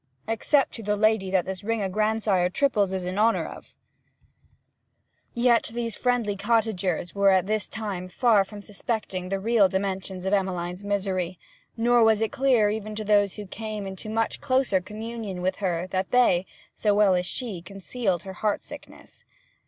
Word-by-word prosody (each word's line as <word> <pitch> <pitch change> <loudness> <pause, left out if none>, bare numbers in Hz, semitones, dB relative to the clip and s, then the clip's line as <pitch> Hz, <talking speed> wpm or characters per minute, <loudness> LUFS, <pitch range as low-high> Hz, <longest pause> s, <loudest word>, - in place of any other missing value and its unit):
'Except 255 +5 +2
to 230 - -7
the 210 -1 0
lady 215 -2 +2
that 185 -2 +1
this 190 +1 -5
ring 225 0 -1
o' - - 0
grandsire 210 -2 +1
triples 205 -4 +1
is 190 -1 -3
in 185 +3 -3
honour 225 +2 +3
of.' - - -11 1.6
Yet 235 -1 +3
these 230 -2 -2
friendly 245 -5 0
cottagers 200 -5 0
were 200 0 +4
at 190 -2 +4
this 215 0 -1
time 200 -5 -5
far 215 +1 +3
from 205 +1 -11
suspecting 200 -3 -4
the 195 0 -1
real 215 -1 +3
dimensions 190 -1 -3
of 190 - 0
Emmeline's 180 -1 -1
misery, 190 -3 -1 0.4
nor 240 +1 +4
was 220 -1 +4
it 225 -1 0
clear 245 -6 +3
even 215 0 -4
to 215 - -3
those 205 -2 +3
who 210 - -7
came 215 +1 -6
into 190 +2 -7
much 225 +1 -1
closer 255 -8 +2
communion 215 0 -6
with 185 +1 0
her 180 -3 -1
than 185 0 -1
they, 190 -8 +3 0.3
so 210 -2 +1
well 205 -2 +5
had 180 0 +1
she 205 -3 -5
concealed 195 0 -3
her 190 - -7
heart 210 +2 -1
sickness. - - -12
205 Hz, 170 wpm, -26 LUFS, 190-225 Hz, 1.6 s, well